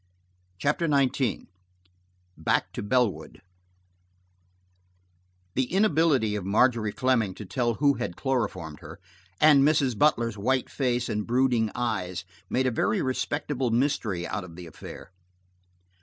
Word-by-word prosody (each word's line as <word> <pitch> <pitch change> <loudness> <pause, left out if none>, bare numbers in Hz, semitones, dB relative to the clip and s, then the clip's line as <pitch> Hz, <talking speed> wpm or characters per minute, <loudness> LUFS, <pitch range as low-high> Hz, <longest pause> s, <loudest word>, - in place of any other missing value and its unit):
CHAPTER 150 - 0
XIX 135 -4 +1 0.9
BACK 80 - 0
TO - - -4
BELLWOOD 120 -1 0 2.1
THE 130 - +1
inability 160 - +2
of 105 - -3
Margery 110 +2 +2
Fleming 115 -6 +1
to 105 - -8
tell 120 +5 -1
who 145 +2 +3
had 90 - -4
chloroformed 100 - -2
her, - - -11 0.4
and 150 -3 +6
Mrs. 140 -4 +3
Butler's 115 -5 +2
white 130 +5 0
face 125 -3 0
and 105 -1 -3
brooding 120 -2 +2
eyes 95 -7 -2 0.2
made 130 +1 +1
a 130 - +2
very 115 - 0
respectable 130 0 -1
mystery 115 -7 0
out 95 +1 -4
of 85 -3 -11
the 90 0 -9
affair. 85 +2 -11
120 Hz, 125 wpm, -26 LUFS, 105-135 Hz, 2.1 s, and